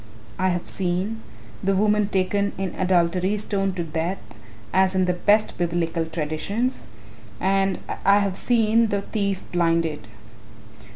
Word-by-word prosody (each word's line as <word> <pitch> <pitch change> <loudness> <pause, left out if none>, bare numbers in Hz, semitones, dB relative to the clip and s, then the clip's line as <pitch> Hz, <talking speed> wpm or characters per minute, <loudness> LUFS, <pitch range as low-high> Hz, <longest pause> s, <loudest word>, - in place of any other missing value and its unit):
I 185 0 +2
have 175 -1 -2
seen, 190 +4 -1 0.4
the 195 0 +2
woman 210 +1 +2
taken 200 +1 0
in 190 -2 -3
adultery 185 +2 +1
stoned 195 -2 -1
to 175 - -2
death 165 +4 -2 0.6
as 190 0 +3
in 185 0 +3
the 180 - +1
best 205 +4 +2
Biblical 170 -1 -1
traditions, 165 - -2 0.5
and 195 0 +1 0.3
I 200 +1 +6
have 200 -2 0
seen 230 0 +3
the 200 -2 -1
thief 200 -2 -2
blinded." 165 -7 0
190 Hz, 130 wpm, -23 LUFS, 175-200 Hz, 0.6 s, I